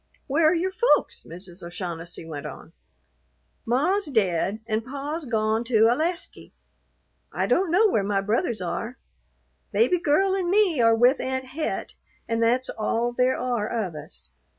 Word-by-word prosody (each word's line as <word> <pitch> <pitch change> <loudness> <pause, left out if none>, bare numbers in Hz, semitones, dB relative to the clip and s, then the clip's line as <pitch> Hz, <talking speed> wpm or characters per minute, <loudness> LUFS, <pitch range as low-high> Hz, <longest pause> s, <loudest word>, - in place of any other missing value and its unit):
"Where 310 +4 +3
are 340 - +2
your 365 +3 0
folks?" 480 +6 +2
Mrs. 180 +1 -7
O'Shaughnessy 170 -1 -6
went 150 -2 -6
on. 160 - -11 0.9
"Ma's 320 - +2
dead, 200 - 0
an 220 -1 -1
pa's 285 +5 -5
gone 220 -1 0
to 225 -2 +4
Alasky. 335 +8 -2 0.8
I - - -1
don't 370 0 +2
know 390 +7 +5
where 220 - +1
my 200 0 0
brothers 215 0 -1
are. 230 +8 -4 0.7
Baby 365 -6 +3
Girl 380 +5 +2
an' 365 -3 -1
me 375 - +3
are 230 0 +5
with 245 +4 +4
Aunt 260 0 -2
Het, 285 +5 -4 0.3
an' 230 0 -1
that's 245 +3 +2
all 230 +2 -1
there 250 +1 +2
are 240 -4 -1
of 215 -7 -2
us." 155 +3 -9
240 Hz, 150 wpm, -25 LUFS, 210-315 Hz, 0.9 s, know